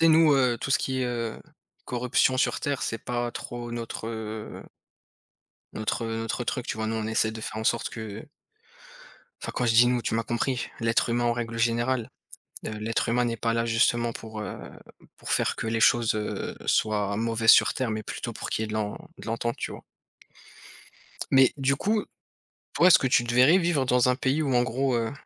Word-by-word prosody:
Tu 165 - +5
sais, - - +6
nous, 160 -1 +6
heu, 125 -3 +2
tout 135 - -4
ce - - +4
qui 130 -1 -2
est, - - 0
heu, 115 -2 -3 0.5
corruption 125 +1 +1
sur - - +1
terre, 140 -2 -2
c'est 115 - -2
pas 120 +1 -3
trop 120 0 -7
notre, 115 -1 -5
heu 110 -1 -6 1.1
notre, 110 +2 -2
heu, 115 0 -3
notre 115 +2 -3
truc, 125 0 -3
tu - - -3
vois, 110 0 -2
nous, 110 - -2
on 110 -1 -2
essaie 110 0 +1
de 110 - -7
faire 110 - -5
en 110 - -4
sorte 115 +1 +1
que 110 +2 -7 1.2
enfin, - - -5
quand 125 - 0
je 115 - +2
dis 120 +2 +7
«nous», 125 -1 +1
tu - - -2
m'as 115 - +1
compris, 120 +2 -2
l'être 115 +1 +1
humain 120 +1 +1
en 120 - +3
règle 115 -1 -4
générale. 120 +1 0 0.6
Heu, - - -2
l'être 110 +1 -1
humain 120 +1 +2
n'est 115 -1 -1
pas 115 0 0
là, 115 0 0
justement, 115 +1 +2
pour, 110 -1 -8
heu, 105 - -6 0.6
pour - - -9
faire - - +1
que - - -4
les 115 0 -1
choses, 115 0 +4
heu, 105 -1 -4
soient 105 -2 +1
mauvaises 115 +1 +3
sur - - +6
terre 130 -3 -1
mais 110 0 -3
plutôt - - -5
pour - - -6
qu'il - - -1
y - - 0
ait - - -6
de - - -6
l'en 105 -1 -2 0.2
de - - -11
l'entente, 115 +1 -2
tu - - -4
vois? - - -10 1.5
Mais 135 -1 +6
du 135 0 +1
coup, 210 +9 0 0.7
toi 175 - +5
est-ce 185 - +8
que - - -3
tu 125 -1 +3
te 120 - -2
verrais 130 +8 +6
vivre 170 -6 +1
dans 125 0 +3
un 125 - +3
pays 135 +4 0
où 140 -4 0
en 120 - +4
gros, 130 +1 0
heu, 115 -1 -1
120 Hz, 220 wpm, -26 LUFS, 110-125 Hz, 1.5 s, est-ce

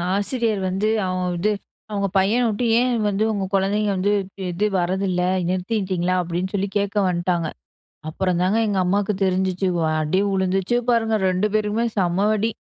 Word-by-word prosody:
ஆசிரியர் 215 0 -1
வந்து 195 +3 0 0.2
அவங்க 185 0 -2
வந்து, 195 +5 +1 0.4
அவங்க 200 -1 0
பையன 200 +6 +3
விட்டு, 225 +2 -1
ஏன் 250 0 +1
வந்து 205 +1 0
உங்க 200 -2 -2
குழந்தைங்க 205 +2 +1
வந்து, 200 +3 +1 0.4
இது 190 +5 0
வரதில்ல, 185 +1 0 0.3
நிறுத்திட்டீங்களா? 185 -2 -1
அப்டின்னு 180 +2 -3
சொல்லி 200 0 -1
கேட்க 200 0 -2
வந்ட்டாங்க. 175 -1 0 0.6
அப்றம்தான் 185 +5 +1
எங்க 205 -2 0
அம்மாக்கு 200 +3 +1
தெரிஞ்சுச்சு. 185 0 0 0.3
அடி 155 +5 +1
விழுந்துச்சு 190 +3 0
பாருங்க 225 -2 +2
2 185 +3 +1
பேருக்குமே 215 +2 +1
செம 185 +2 +1
அடி. 220 +2 0
195 Hz, 140 wpm, -22 LUFS, 185-210 Hz, 0.6 s, பையன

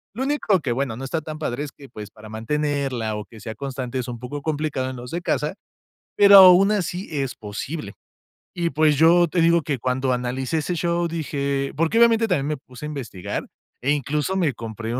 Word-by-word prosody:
Lo 260 - -2
único 270 -9 +1
que, 130 - -2
bueno, 125 -2 -1
no 130 - -7
está 160 +4 -2
tan 155 0 -7
padre 145 -3 -3
es 145 - -7
que, 140 -2 -14
pues, 105 -1 -9
para 110 0 -14
mantenerla 130 -1 -2
o 105 - -5
que 110 - -15
sea 110 +1 -6
constante 130 0 -4
es 125 - -4
un 120 -1 -5
poco 125 +4 -6
complicado 150 -4 -2
en 130 - -6
los 125 0 -9
de 175 +1 -3
casa, 150 0 -1 0.6
pero 200 -1 +8
aún 190 +2 +8
así 185 -2 -2
es 135 -4 -2
posible. 105 +2 -6 0.6
Y, 170 -1 -1
pues, 150 -2 +3
yo 170 +2 +5
te 175 - 0
digo 170 0 +4
que 145 -3 -2
cuando 130 +2 -1
analicé 125 +4 -2
ese 165 +3 -1
show 170 +1 0
dije 140 -4 -2
porque, 165 +7 +1
obviamente 230 -1 +5
también 145 -7 0
me 150 -2 -2
puse 130 +1 -14
a - - -3
investigar, 120 -11 -5 0.3
e 140 +3 0
incluso 150 +5 -1
me 170 -7 +2
compré 115 +1 -5
un - - 0
145 Hz, 210 wpm, -23 LUFS, 125-165 Hz, 0.6 s, pero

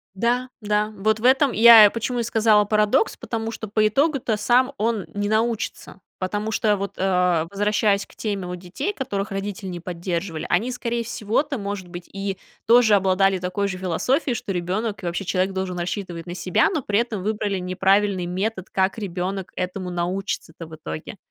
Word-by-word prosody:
Да, 245 +5 0
да, 210 0 0
вот 215 +2 +1
в 225 - -10
этом 265 +2 +5
я 225 -2 +9
и - - +6
почему 235 +2 -2
и - - +1
сказала: 220 -2 +3
"Парадокс"- 215 - +2
потому 225 -1 -4
что 220 -1 -6
по 215 +1 +2
итогу-то 270 -2 +1
сам 250 +5 +3
он 220 -4 0
не 205 0 -2
научится, 220 -2 -2 0.2
потому 205 +4 -2
что 210 -1 +2
вот, 200 0 -4
а, 180 -3 +2
возвращаясь 205 0 +1
к - - -20
теме 200 -4 -3
вот 180 0 -5
детей, 195 - -4
которых 205 - -3
родители 195 0 -4
не 175 -1 -5
поддерживали, 170 -1 -4
они, 215 +8 +1
скорее 235 -1 -2
всего-то, 240 +6 -1
может 200 -3 -5
быть, 175 0 -9
и 195 -1 -4 0.3
тоже 230 -1 +6
обладали 195 -1 +3
такой 185 +3 -1
же 190 -2 -3
философией, 235 - 0
что 195 - -4
ребёнок, 190 +4 -2
и - - -4
вообще 175 +3 -2
человек, 185 +1 0
должен 190 -2 -3
рассчитывать 175 -2 -4
на 175 - -5
себя, 185 - +2
но 320 - -1
при 205 -1 +1
этом 235 -4 -3
выбрали 210 -2 -1
неправильный 190 +1 +1
метод, 190 +2 -3
как 190 +2 0
ребёнок 190 -1 -4
этому 180 0 -3
научится-то 175 -2 -4
в 160 - -10
итоге. 80 - -7
200 Hz, 180 wpm, -23 LUFS, 185-225 Hz, 0.3 s, я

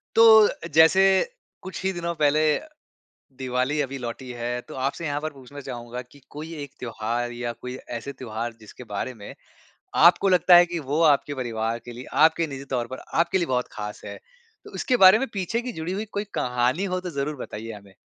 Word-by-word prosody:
तो 225 - +7 0.5
जैसे 160 +4 +6 0.6
कुछ 190 0 -7
ही 190 - +1
दिनों 170 -1 -3
पहले 150 0 +3 1.0
दिवाली 130 +3 -1
अभी 135 0 -3
लौटी 125 +1 -6
है, 120 0 -3
तो - - -12
आपसे 135 +5 -2
यहाँ 145 -1 -2
पर 155 - -2
पूछना 135 +1 -12
चाहूँगा 120 -1 -6
कि 125 +3 -18
कोई 155 +3 -8
एक 140 - -10
त्योहार 120 +1 -3
या 120 0 -4
कोई 125 0 -6 0.2
ऐसे 140 +4 -6
त्योहार 115 -2 -5
जिसके 110 +3 -12
बारे 115 +5 -3
में 105 -4 -10 0.7
आपको 175 +3 +6
लगता 180 -1 +6
है 175 0 +7
कि 175 0 -4
वो 150 +3 +1
आपके 145 -2 +3
परिवार 115 -3 -2
के 120 - -8
लिए, 120 +2 -9
आपके 160 +1 +4
निजी 135 -2 -7
तौर 125 -3 -1
पर 130 +2 -8 0.2
आपके 170 +3 +2
लिए 175 - 0
बहुत 125 -3 -1
खास 105 0 -6
है, - - -7 0.5
तो - - -13
इसके 255 - +1
बारे 190 -1 +8
में 270 - -1
पीछे 200 +3 -1
की 250 0 -5
जुड़ी 160 -1 -4
हुई 205 +3 -2
कोई 205 - -2
कहानी 125 +8 0
हो 185 -2 -1
तो 180 -1 -5
ज़रूर 145 0 -3
बताइए 115 -3 -7
हमें? 100 -2 -13
140 Hz, 200 wpm, -25 LUFS, 120-170 Hz, 1.0 s, बारे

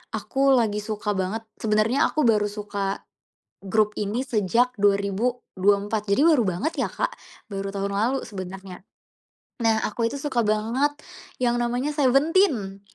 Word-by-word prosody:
aku 275 0 +1
lagi 215 -4 +1
suka 210 -1 -2
banget 190 +4 -2 0.2
sebenernya 220 +5 +2
aku 305 - +1
baru 215 -2 +4
suka 200 -2 -4 0.6
grup 210 +2 +1
ini 210 +5 -1
sejak 230 +3 +2
2024. 205 0 +1
Jadi 200 +8 +3
baru 310 -7 +5
banget 185 - -2
ya, - - +1
Kak, - - -1 0.4
baru 195 0 -3
tahun 200 0 -2
lalu 225 +7 +1
sebenarnya. 190 -1 -8 0.7
Nah, 225 -2 +2
aku 230 +2 -1
itu 230 - -5
suka 270 -4 -1
banget 230 +8 +1 0.4
yang 240 -1 +1
namanya 245 +4 -1
Seventeen, 275 - +2
215 Hz, 135 wpm, -24 LUFS, 200-250 Hz, 0.7 s, baru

